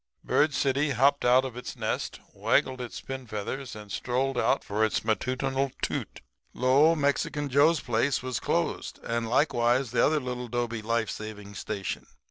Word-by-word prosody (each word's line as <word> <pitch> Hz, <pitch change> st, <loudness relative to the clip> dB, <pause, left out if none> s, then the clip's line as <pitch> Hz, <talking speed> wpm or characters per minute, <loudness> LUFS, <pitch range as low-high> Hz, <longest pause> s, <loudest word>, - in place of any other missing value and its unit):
"Bird 150 Hz, +1 st, +3 dB
City 140 Hz, +2 st, +1 dB
hopped 140 Hz, +2 st, +3 dB
out 125 Hz, +2 st, +5 dB
of 130 Hz, -3 st, -6 dB
its 125 Hz, -, -6 dB
nest, -, -, -3 dB
waggled 130 Hz, -1 st, +1 dB
its 120 Hz, -, -6 dB
pin 130 Hz, -2 st, -6 dB
feathers 110 Hz, +5 st, -5 dB
and 105 Hz, -1 st, -10 dB
strolled 130 Hz, +5 st, -1 dB
out 135 Hz, -, +2 dB
for 105 Hz, +2 st, 0 dB
its 110 Hz, 0 st, 0 dB
matutinal 130 Hz, +5 st, 0 dB
toot. -, -, -3 dB, 0.3 s
Lo! 140 Hz, +6 st, +5 dB
Mexican 145 Hz, 0 st, 0 dB
Joe's 145 Hz, +4 st, +4 dB
place 120 Hz, +3 st, 0 dB
was 130 Hz, -2 st, -2 dB
closed -, -, -1 dB
and 115 Hz, -1 st, -2 dB
likewise 125 Hz, -2 st, +2 dB
the 120 Hz, -1 st, +3 dB
other 155 Hz, 0 st, +3 dB
little 125 Hz, -2 st, -4 dB
'dobe 120 Hz, -1 st, -2 dB
life 115 Hz, 0 st, 0 dB
saving 105 Hz, -2 st, -7 dB
station. 100 Hz, -2 st, -4 dB
125 Hz, 160 wpm, -28 LUFS, 115-135 Hz, 0.3 s, out